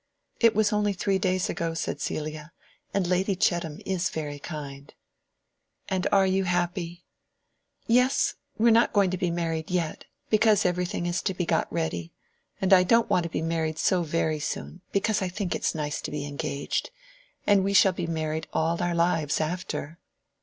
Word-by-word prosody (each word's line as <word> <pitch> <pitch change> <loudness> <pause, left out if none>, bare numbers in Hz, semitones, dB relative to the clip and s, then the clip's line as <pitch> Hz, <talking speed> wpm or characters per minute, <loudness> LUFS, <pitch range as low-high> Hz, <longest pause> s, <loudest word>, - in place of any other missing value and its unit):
"It 230 -3 +5
was 215 0 +3
only 210 -1 +1
three 195 +1 0
days 185 -1 +1
ago," 165 -1 -2
said - - -3
Celia. 155 +2 -4 0.4
"And 195 -2 0
Lady 185 +2 +1
Chettam 170 -4 0
is 185 -2 0
very 145 -2 -5
kind." 140 -3 -7 1.0
"And 190 -1 -1
you - - +2
are 195 -1 +5
very 190 0 +2
happy?" 175 -1 -2 0.8
"Yes. 250 +4 +3 0.2
We 230 +2 +4
are - - +6
not 230 +1 +4
going 200 -4 +3
to 185 - -1
be 180 -2 +1
married 165 -2 -2
yet. 175 -4 -2 0.3
Because 215 -1 +4
every 180 0 +1
thing 175 -1 -3
is 175 +1 -1
to 190 - -2
be 175 - -1
got 165 -1 0
ready. 90 - -3 0.5
And 190 0 +3
I 185 - +8
don't 230 +6 +3
want 175 - +3
to - - -3
be 160 - -2
married 160 -1 -1
so 180 +3 +2
very 160 -1 0
soon, 170 +3 -5
because 205 +1 +1
I 190 - 0
think 180 0 -3
it - - -3
is - - 0
nice 150 -1 -2
to - - -4
be 150 -1 -4
engaged. 140 0 -3 0.6
And 200 -2 +4
we 200 +1 0
shall 190 -1 +6
be 175 -2 -3
married 160 -1 -2
all 165 +2 0
our 175 -1 0
lives 170 -3 +1
after." 165 -1 -3
175 Hz, 190 wpm, -27 LUFS, 160-190 Hz, 1.0 s, I